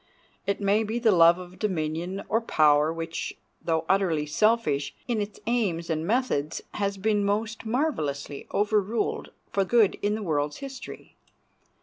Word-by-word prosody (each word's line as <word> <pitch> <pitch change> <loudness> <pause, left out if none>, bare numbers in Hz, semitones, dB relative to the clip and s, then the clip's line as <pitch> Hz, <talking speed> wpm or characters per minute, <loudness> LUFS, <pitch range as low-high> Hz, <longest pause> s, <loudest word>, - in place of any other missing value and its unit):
It 200 - 0
may 205 +2 +2
be 220 +2 -2
the 230 -2 +4
love 170 -1 +6
of 180 0 -11
dominion 175 0 -2
or 225 +2 +1
power 150 -6 +4
which, 165 0 -5 0.3
though 160 -1 0
utterly 180 -6 +2
selfish 150 -4 +1
in 235 -4 0
its 205 0 -6
aims 195 -8 0
and 160 +1 -1
methods, 210 - 0
has 200 -1 -1
been 205 +1 +1
most 215 +2 -1
marvelously 155 - -2
overruled 210 +1 0 0.2
for 195 - +2
good 220 +1 +3
in 205 +1 +1
the 215 - -4
world's 145 -4 -1
history. 270 -2 -9
195 Hz, 145 wpm, -26 LUFS, 160-220 Hz, 0.3 s, love